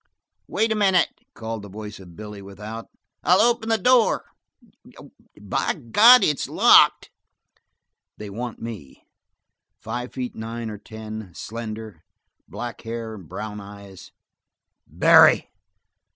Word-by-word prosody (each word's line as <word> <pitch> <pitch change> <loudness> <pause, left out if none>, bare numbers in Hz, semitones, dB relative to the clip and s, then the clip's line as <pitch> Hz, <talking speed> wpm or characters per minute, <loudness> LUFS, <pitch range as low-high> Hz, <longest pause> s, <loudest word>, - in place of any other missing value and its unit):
"Wait 225 0 0
a - - +1
minute," 190 -4 +3 0.3
called 110 -1 -6
the 100 - -11
voice 105 +1 -9
of 90 -3 -14
Billy 105 0 -9
without. 105 +3 -9 0.4
"I'll 180 +2 +4
open 230 -1 +2
the 225 - +3
door. 245 +2 +3 1.1
By - - -2
God, 210 - +6
it's 150 -3 0
locked!" - - +5 1.1
"They 105 - -8
want 115 +4 -6
me 110 - -9 0.7
five 120 +3 -6
feet 125 -2 -5
nine 115 0 -6
or 105 - -9
ten, 110 -3 -9
slender, 110 -5 -8 0.4
black 120 -1 -7
hair 115 -1 -6
and 95 -7 -12
brown 105 +3 -6
eyes 100 -2 -13 0.4
" - - -61
"Barry!" - - +5
110 Hz, 125 wpm, -23 LUFS, 105-125 Hz, 1.1 s, God